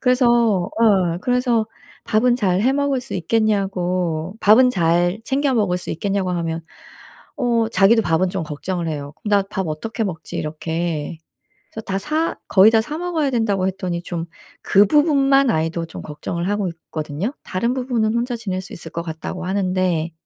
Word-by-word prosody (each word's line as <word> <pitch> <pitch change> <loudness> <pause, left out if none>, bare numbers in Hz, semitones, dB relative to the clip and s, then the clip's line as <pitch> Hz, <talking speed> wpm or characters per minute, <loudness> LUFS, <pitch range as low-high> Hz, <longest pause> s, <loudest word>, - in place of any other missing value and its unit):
그래서 250 0 +3
어 205 -5 +2
그래서 245 -2 +1 0.4
“밥은 240 +3 +2
잘 190 -5 +1
해 260 +4 +3
먹을 280 -2 0
수 255 - -7
있겠냐?“고 185 -3 0
“밥은 250 +5 +6
잘 175 +1 +1
챙겨 275 0 +1
먹을 200 -6 +1
수 - - -6
있겠냐?“고 195 +1 -1
하면 165 -2 -2 0.7
어 235 -4 +1
자기도 225 +2 +4
밥은 180 0 +1
좀 190 -2 -3
걱정을 170 +3 -4
해요. 145 -2 -5
"나 205 -1 +3
밥 190 -1 -4
어떻게 225 +9 -3
먹지?" 165 -6 -5
이렇게. 160 0 -3 0.5
그래서 220 - -6
“다 195 0 -2
사 310 +8 -1
거의 205 +3 +6
다 225 -1 +4
사 300 +6 -5
먹어야 335 -5 -1
된다.“고 205 -6 +1
했더니 185 -2 -3
좀 170 -2 -4 0.4
그 200 +1 +5
부분만 275 -2 +4
아이도 165 +1 -1
좀 165 - -9
걱정을 170 +4 -4
하고 205 -2 0
있거든요. 160 - -5
“다른 235 +7 -1
부분은 240 -4 0
혼자 240 +1 -1
지낼 190 -5 -3
수 190 - -10
있을 - - -8
것 170 - -4
같다.“고 170 +2 -6
하는데 185 -4 0
195 Hz, 325 characters per minute, -21 LUFS, 170-235 Hz, 0.7 s, 밥은